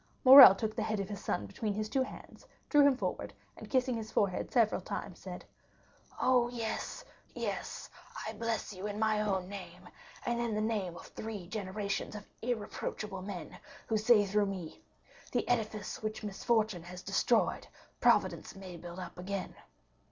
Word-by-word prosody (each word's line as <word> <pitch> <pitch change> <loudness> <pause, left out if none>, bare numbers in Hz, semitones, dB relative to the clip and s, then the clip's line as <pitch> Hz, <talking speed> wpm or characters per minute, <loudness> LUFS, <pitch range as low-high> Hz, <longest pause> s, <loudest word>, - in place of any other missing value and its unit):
Morrel 260 -6 +12
took 215 +1 -3
the 225 - -1
head 215 -1 -1
of 195 0 -3
his 205 -2 -6
son 100 - -1
between 200 - -3
his 215 0 -2
two 265 +4 0
hands, 260 - -8 0.2
drew 295 - +6
him 270 -3 +3
forward, - - -3 0.2
and - - -11
kissing 255 -1 +2
his 220 -1 -5
forehead 195 -3 0
several 220 -6 +3
times 180 0 -6
said: 180 -2 -8 0.7
"Oh, 250 -2 +3
yes, 230 -2 -4 0.3
yes, - - -4 0.4
I - - -4
bless 230 -2 -2
you 190 +2 -5
in 205 0 -4
my 215 -1 +2
own 190 -3 -1
name, 185 -2 -9 0.4
and 240 0 0
in 235 -2 -1
the - - 0
name 210 -5 -1
of - - -10
three 215 -4 -7
generations 200 +1 -3
of 205 0 -8 0.2
irreproachable 215 -3 -3
men, 185 -3 -7 0.3
who 225 - -1
say 215 -1 +5
through 205 +1 +1
me, 185 -5 -6 0.5
'The - - 0
edifice 215 -4 -1
which 215 0 -4
misfortune 210 -1 0
has 180 +2 -9
destroyed, - - +1 0.3
Providence - - +2
may 185 -2 -9
build 175 +1 -9
up 180 -1 -8
again. 190 +1 -4
210 Hz, 165 wpm, -32 LUFS, 190-225 Hz, 0.7 s, Morrel